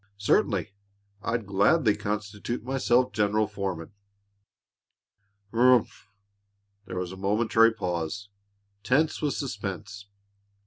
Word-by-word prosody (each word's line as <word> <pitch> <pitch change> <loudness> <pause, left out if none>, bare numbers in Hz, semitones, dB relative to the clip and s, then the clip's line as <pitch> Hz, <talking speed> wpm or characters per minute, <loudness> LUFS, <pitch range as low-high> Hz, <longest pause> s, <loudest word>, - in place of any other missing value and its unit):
"Certainly! 100 -1 +1 0.5
I'd 115 0 -2
gladly 105 - +3
constitute 105 +2 -4
myself 125 -1 +2
general 105 +1 +2
foreman." 95 -5 -5 1.6
"Humph!" 125 0 +3 0.8
There 95 - -6
was 90 -1 -3
a 95 - -9
momentary 110 +3 +3
pause, 90 -1 -4 0.5
tense 135 +8 +1
with 145 -2 0
suspense. 100 -4 -5
105 Hz, 90 wpm, -27 LUFS, 100-120 Hz, 1.6 s, gladly